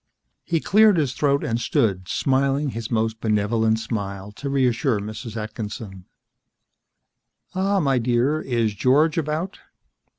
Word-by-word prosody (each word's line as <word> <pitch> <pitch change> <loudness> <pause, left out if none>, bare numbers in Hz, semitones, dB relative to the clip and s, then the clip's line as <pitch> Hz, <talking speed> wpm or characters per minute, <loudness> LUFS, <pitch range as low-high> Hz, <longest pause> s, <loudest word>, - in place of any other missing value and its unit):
He 165 -2 0
cleared 210 +2 +5
his 140 -5 0
throat 140 0 +1
and 115 +1 -1
stood, 95 -7 0
smiling 140 +4 +1
his 115 -1 -5
most 110 -1 -1
benevolent 110 +1 +1
smile 100 -3 -4
to 140 +7 -6
reassure 130 -3 +1
Mrs. 110 +2 -7
Atkinson. 105 -3 -6 1.5
"Ah, 195 +1 +1
my 135 -6 +2
dear. 125 +6 +1
Is 115 -4 0
George 145 - +3
about?" 160 +5 -3
120 Hz, 125 wpm, -23 LUFS, 110-145 Hz, 1.5 s, cleared